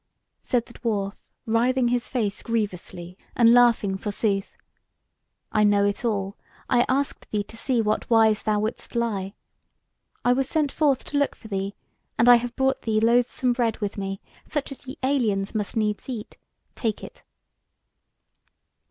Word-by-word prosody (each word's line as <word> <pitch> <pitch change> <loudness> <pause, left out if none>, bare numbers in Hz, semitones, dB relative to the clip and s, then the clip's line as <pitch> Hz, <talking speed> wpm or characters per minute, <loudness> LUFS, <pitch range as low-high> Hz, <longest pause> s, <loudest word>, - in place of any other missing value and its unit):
Said 240 -2 0
the 235 - -15
dwarf, 205 -4 -2 0.3
writhing 240 +2 +2
his 245 0 0
face 215 -6 -2
grievously, 185 -5 -4 0.2
and 235 -1 +6
laughing 230 -5 +4
forsooth: 200 -1 -2 0.9
"I 215 - +3
know 205 -1 +4
it 205 +4 -1
all: 200 -4 -1 0.3
I 245 -1 +3
asked 275 +2 -1
thee 210 -1 -1
to 220 - -14
see 240 +1 0
what 210 0 -1
wise 220 -2 +4
thou 210 -1 +1
wouldst 220 +3 -4
lie. 205 -4 -1 0.9
I 245 - +5
was 270 +1 0
sent 300 -3 +1
forth 285 -4 +1
to 290 - -1
look 285 - +1
for 220 - -13
thee; 195 0 -3 0.4
and 230 - +4
I 245 -1 +9
have 240 +1 -5
brought 265 0 +1
thee 220 -1 +1
loathsome 245 +2 +2
bread 235 -2 0
with 205 -2 -3
me, 195 0 -4 0.2
such 295 -2 -3
as 275 0 -10
ye 265 - -7
aliens 225 -8 +1
must 210 0 -2
needs 210 +2 -1
eat: 235 -3 -6 0.4
take 220 -3 -2
it!" - - -11
225 Hz, 160 wpm, -25 LUFS, 205-245 Hz, 0.9 s, I